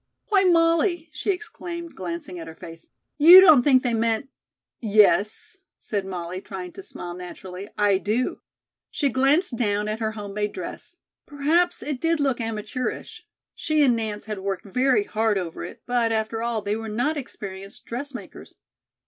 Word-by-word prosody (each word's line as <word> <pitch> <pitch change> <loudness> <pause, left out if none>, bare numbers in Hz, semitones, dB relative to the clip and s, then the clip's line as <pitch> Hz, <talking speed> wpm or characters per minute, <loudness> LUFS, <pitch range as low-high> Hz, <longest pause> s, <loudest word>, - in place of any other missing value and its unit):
"Why, 390 -2 +4
Molly," 335 0 +3
she - - -5
exclaimed, 340 -2 -4
glancing 175 0 -6
at 165 - -8
her 160 - -9
face, 165 0 -12 0.3
"you 340 +5 +11
don't 315 -9 +8
think 260 -1 +4
they 245 -2 0
meant 230 +3 0 0.4
" - - -68 0.2
"Yes," 210 - 0 0.2
said 200 -3 -3
Molly, 180 0 -5
trying 185 -3 -7
to 195 - -10
smile 175 -2 -7
naturally, 180 +2 -8
"I 205 -2 +3
do." 220 +6 -1 0.5
She 285 - 0
glanced 270 +2 +2
down 210 -2 0
at 215 +1 -3
her 220 -1 -1
home 205 -2 -7
made 210 0 -2
dress. - - -7 0.3
Perhaps 325 +5 +1
it 290 -4 -4
did 330 -1 +1
look 270 -4 0
amateurish. 225 - -4 0.3
She 310 -1 +1
and 250 -4 +4
Nance 215 -2 -4
had 215 -2 -5
worked 195 0 -3
very 260 - +2
hard 220 - 0
over 175 -3 -4
it, - - -9
but, 240 -2 +1
after 225 0 -1
all, 230 -2 -2
they 205 +1 -1
were 225 0 -5
not 245 +9 0
experienced 195 -7 -8
dressmakers. 255 +2 -7
225 Hz, 165 wpm, -24 LUFS, 200-290 Hz, 0.5 s, you